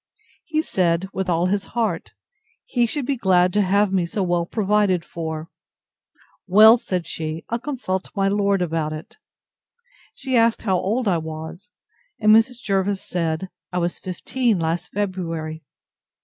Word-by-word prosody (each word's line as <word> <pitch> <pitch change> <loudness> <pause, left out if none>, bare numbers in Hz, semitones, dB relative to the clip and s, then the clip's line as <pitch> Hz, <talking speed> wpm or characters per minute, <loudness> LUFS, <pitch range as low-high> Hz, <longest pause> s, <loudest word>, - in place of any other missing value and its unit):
He 315 -1 0
said, 175 - +1
with 190 -1 -2
all 170 0 +2
his 195 +1 0
heart; 225 -2 -1 0.5
he 240 -2 +1
should 280 +3 -2
be 280 - 0
glad 180 -5 +3
to 210 - +3
have 200 +1 +2
me 180 -3 +1
so 195 +3 -2
well 175 -1 0
provided 205 -4 +1
for. 160 -1 -5 1.0
Well, 215 +5 +8
said 180 -6 -3
she, 155 0 -5
I'll 235 - -1
consult 240 -9 -3
my 195 -1 +2
lord 200 -1 +2
about 160 -2 -2
it. 155 - -9 1.0
She 265 -2 -2
asked 230 -1 +3
how 190 -4 +2
old 220 +6 -1
I 175 -4 +2
was; 160 +5 -8 0.5
and 215 0 +6
Mrs. 230 +2 +3
Jervis 195 -1 0
said, 170 +1 -2 0.2
I 180 - -3
was 175 0 -1
fifteen 225 +4 -1
last 165 +1 -2
February. 165 -6 -3
190 Hz, 150 wpm, -22 LUFS, 170-215 Hz, 1.0 s, Well